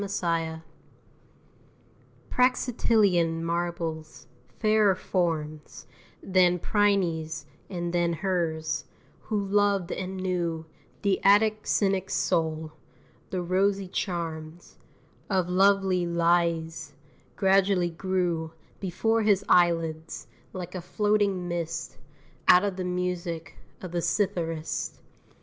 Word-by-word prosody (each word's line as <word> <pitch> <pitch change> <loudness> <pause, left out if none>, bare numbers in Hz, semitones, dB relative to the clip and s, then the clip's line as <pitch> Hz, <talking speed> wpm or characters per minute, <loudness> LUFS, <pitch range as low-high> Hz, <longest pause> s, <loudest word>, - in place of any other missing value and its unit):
ELEUSINIAN 165 -5 -2 1.7
Praxitelean 215 -9 +2
marbles, 165 -2 -3 0.3
fairer 215 -3 +4
forms 155 -5 -3 0.4
Than 180 -2 +3
Phryne's 180 -6 0 0.2
and 175 -2 -3
than 175 -1 +1
hers, 160 -4 -1 0.4
who 215 -2 -1
loved 200 -2 +1
and 190 0 -4
knew 175 -3 -2 0.4
The 200 -2 +1
Attic 215 +2 +4
cynic's 195 -2 +1
soul, 160 -3 0 0.6
the 185 -1 -2
rosy 195 +2 +1
charms 170 -3 -5 0.5
Of 185 -3 +1
lovely 190 -1 +3
Laïs, 170 -1 0 0.4
gradually 190 -2 +3
grew 170 -2 -1 0.3
Before 225 +5 0
his 200 -2 +2
eyelids, 165 -2 +2 0.3
like 180 -2 -7
a 185 - -4
floating 205 -1 0
mist, 170 -1 -4 0.5
Out 180 +1 +7
of 200 -2 -1
the 185 - -3
music 180 -2 -3 0.3
of 185 - -6
the 175 - -1
citharist. 165 -5 -1
180 Hz, 95 wpm, -27 LUFS, 165-195 Hz, 1.7 s, Out